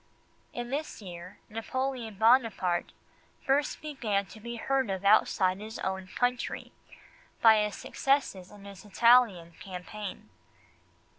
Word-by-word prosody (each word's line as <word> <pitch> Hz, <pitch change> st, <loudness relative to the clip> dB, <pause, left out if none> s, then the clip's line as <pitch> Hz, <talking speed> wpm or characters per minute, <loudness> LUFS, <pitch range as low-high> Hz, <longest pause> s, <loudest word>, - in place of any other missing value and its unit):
In 240 Hz, 0 st, -6 dB
this 300 Hz, +3 st, -3 dB
year 180 Hz, -1 st, -10 dB
Napoleon 235 Hz, 0 st, -3 dB
Buonaparte 220 Hz, -5 st, +2 dB, 0.5 s
first 285 Hz, +3 st, +1 dB
began 225 Hz, -10 st, -1 dB
to 215 Hz, -, -13 dB
be 235 Hz, +2 st, -6 dB
heard 265 Hz, +1 st, 0 dB
of 190 Hz, 0 st, -3 dB
outside 195 Hz, -2 st, +4 dB
his 220 Hz, +1 st, -7 dB
own 190 Hz, 0 st, -3 dB
country, 245 Hz, +5 st, -2 dB, 0.7 s
by 220 Hz, -1 st, +7 dB
his 210 Hz, -1 st, -3 dB
successes 270 Hz, -10 st, -1 dB
in 205 Hz, -1 st, -14 dB
his 200 Hz, -2 st, -11 dB
Italian 210 Hz, -5 st, +4 dB
campaign. 190 Hz, +2 st, -8 dB
215 Hz, 120 wpm, -29 LUFS, 190-245 Hz, 0.7 s, by